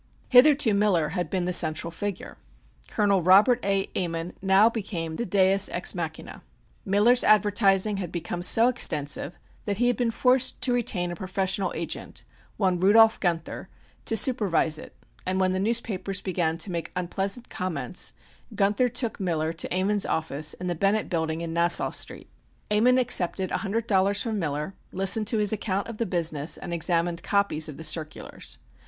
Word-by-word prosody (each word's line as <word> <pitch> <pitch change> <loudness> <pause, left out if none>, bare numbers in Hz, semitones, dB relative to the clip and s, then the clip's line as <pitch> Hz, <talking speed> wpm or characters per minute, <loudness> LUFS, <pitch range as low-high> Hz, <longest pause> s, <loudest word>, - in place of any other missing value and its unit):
Hitherto 265 -2 +5
Miller 195 -7 +1
had 175 +2 -4
been 185 -2 -2
the 180 - -2
central 160 0 +2
figure. 195 +3 -6 0.5
Col. 200 -3 +1
Robert 200 +8 +4
A. 195 -1 0
Ammon 170 -1 -3
now 195 +3 +4
became 180 -8 -4
the 235 - -4
deus 195 0 +3
ex - - 0
machina. - - -7 0.4
Miller's 210 +6 +3
advertising 205 -1 +2
had 180 -4 -5
become 175 0 -5
so 225 +6 +5
extensive 150 - 0 0.3
that 200 -2 -2
he 245 - +1
had 245 0 +2
been 240 +1 -1
forced 250 +2 +1
to 250 -1 +2
retain 185 -7 -1
a - - -6
professional 190 +1 -2
agent, 165 0 -5 0.3
one 185 -3 0
Rudolph 220 +4 +4
Guenther, 170 -3 -3 0.4
to 225 - +1
supervise 195 - +3
it, - - -12 0.3
and 185 +1 -2
when 185 -1 +1
the 185 - -2
newspapers 200 -3 -1
began 170 -4 -2
to 185 - -3
make 170 -1 -5
unpleasant 195 +6 -2
comments, 180 -2 -2 0.4
Guenther 205 +5 +1
took 235 -1 -3
Miller 165 -4 -2
to 165 - -4
Ammon's 195 +3 0
office 155 -1 -1
in 180 - -8
the 175 - -1
Bennett 200 +5 -1
Building 160 -1 -2
in 165 -1 -5
Nassau 170 +1 +4
Street. - - -1 0.4
Ammon 240 +5 +3
accepted 190 -7 +1
a - - 0
hundred 220 +2 -3
dollars 200 -1 +1
from 220 -3 -3
Miller, 150 +1 -4 0.2
listened 195 +3 +3
to 225 - +1
his 210 0 +2
account 200 -2 -3
of 230 -2 -8
the 230 - -2
business 165 -4 0
and 175 - -7
examined 170 0 0
copies 200 -7 0
of 150 - -10
the 160 - -8
circulars. 155 -1 -3
190 Hz, 170 wpm, -25 LUFS, 170-215 Hz, 0.5 s, Hitherto